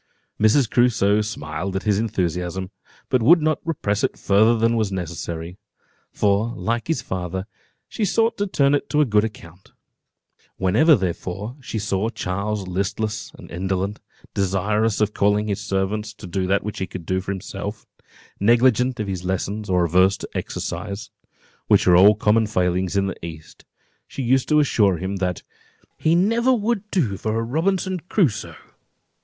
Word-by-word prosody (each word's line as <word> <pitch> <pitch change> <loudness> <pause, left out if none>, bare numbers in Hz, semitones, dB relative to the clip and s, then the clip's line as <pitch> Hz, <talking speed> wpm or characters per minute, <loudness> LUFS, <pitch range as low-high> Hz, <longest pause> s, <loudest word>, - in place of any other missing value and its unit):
Mrs. 110 +4 +4
Crusoe 110 -4 +3
smiled 95 -3 -4
at 95 - -2
his 105 -2 +2
enthusiasm, 95 -3 -2 0.4
but 130 -2 +2
would 165 +10 +6
not 155 -1 +1
repress 105 -11 -1
it - - 0
further 110 +4 +3
than 115 +1 +2
was 110 -3 0
necessary; 85 0 -5 0.5
for, 105 +4 +1
like 115 +1 -2
his 160 -9 -1
father, 95 0 -4 0.4
she 220 - -4
sought 225 +3 +2
to 205 - 0
turn 140 -6 +2
it 145 - 0
to 150 - +3
a - - +4
good 105 -4 +3
account. 95 -5 -9 0.8
Whenever, 110 - +4
therefore, 95 +3 -4
she 120 - -5
saw 100 0 -1
Charles 100 -1 -3
listless 100 +4 -3
and - - -13
indolent, 95 +3 -2 0.3
desirous 100 +3 0
of 105 0 +1
calling 105 +1 +2
his 100 -2 -2
servant 100 +2 -1
to 110 -1 -10
do 95 +1 -2
that 100 +1 +1
which 105 - -5
he 95 - -2
could 90 -1 -8
do 95 +2 0
for 95 - -4
himself, 100 +2 -6 0.5
negligent 120 +3 +3
of 105 - -1
his 95 -2 -4
lessons, 100 +3 -3
or 90 -1 +3
averse 95 +4 +3
to - - -8
exercise, 105 +1 -5 0.6
which - - +4
are 90 - +6
all 100 +4 +7
common 110 +2 +2
failings 90 -1 0
in 100 - +2
the 95 -4 -5
east, 80 -2 -10 0.4
she 135 - -5
used 130 +2 +2
to 150 -1 +5
assure 105 - +3
him 95 +3 -3
"that 90 -2 -2 0.6
he 160 +1 +3
never 230 +8 +3
would 215 -2 -2
do 125 - 0
for 110 +2 -2
a 115 - 0
Robinson 185 +8 0
Crusoe." 140 - 0
105 Hz, 165 wpm, -22 LUFS, 95-120 Hz, 0.8 s, all